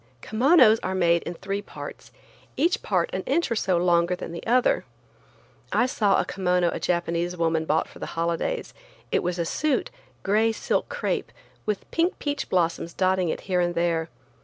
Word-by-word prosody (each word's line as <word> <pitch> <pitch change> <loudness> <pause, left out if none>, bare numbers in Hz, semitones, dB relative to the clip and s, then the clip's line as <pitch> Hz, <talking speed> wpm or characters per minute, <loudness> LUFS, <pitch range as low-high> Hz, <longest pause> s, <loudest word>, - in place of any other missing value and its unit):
Kimonos 240 -1 +5
are 190 +1 -2
made 170 -2 +3
in 170 - -4
three 195 +3 -3
parts, - - -10 0.5
each 345 +2 +2
part 180 -4 0
an 190 - -1
inch 325 +2 +1
or - - +2
so 190 -4 +1
longer 175 0 +2
than 180 - -7
the 170 - -7
other. 250 +2 +3 0.9
I 245 - +3
saw 210 -6 +2
a - - +1
kimono 180 -2 +1
a - - -4
Japanese 175 0 -1
woman 165 -1 +1
bought 160 +1 +1
for - - -14
the - - -5
holidays. 170 - -1 0.4
It - - +2
was 180 0 -2
a 170 - -1
suit, 295 - 0 0.3
gray 220 +3 +2
silk - - -1
crepe, - - -2 0.4
with 210 -2 -3
pink 340 +3 +1
peach 290 -1 -3
blossoms 170 -1 0
dotting 185 -2 +2
it - - -3
here 180 -2 0
and 175 0 0
there. 170 -1 0
180 Hz, 180 wpm, -25 LUFS, 170-220 Hz, 0.9 s, Kimonos